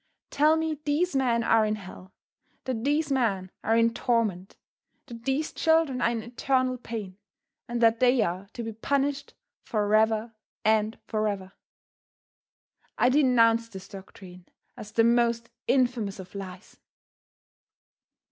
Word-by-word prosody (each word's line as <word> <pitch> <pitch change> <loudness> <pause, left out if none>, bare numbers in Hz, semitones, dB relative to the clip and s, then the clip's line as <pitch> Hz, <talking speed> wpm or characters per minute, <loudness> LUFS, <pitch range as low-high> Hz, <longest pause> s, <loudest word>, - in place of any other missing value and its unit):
Tell 305 +2 +4
me 320 -2 -2
these 305 +3 0
men 240 -3 +2
are 225 -1 +4
in 215 0 0
hell; 190 -2 -11 0.5
that 245 -4 -3
these 295 +2 0
men 200 -8 0
are 225 +1 +2
in 230 0 +3
torment; 215 -7 -1 0.5
that 230 -3 -11
these 270 +3 -1
children 320 -6 +2
are - - +3
in 230 -2 -3
eternal 255 +1 -1
pain, 210 -5 -7 0.5
and 240 0 -3
that 225 0 +4
they 250 -2 +4
are 185 +2 -3
to 235 - -5
be 225 0 -5
punished 280 +5 -2 0.3
forever 220 +1 +1 0.3
and 220 0 +2
forever! 205 -4 -2 1.5
I 245 - +4
denounce 230 -4 +3
this 190 -4 -10
doctrine 185 -2 -12 0.3
as 210 - -10
the 225 - +3
most 235 0 +2 0.2
infamous 245 -6 +1
of 185 -1 -10
lies. 190 -1 -9
230 Hz, 130 wpm, -27 LUFS, 210-255 Hz, 1.5 s, Tell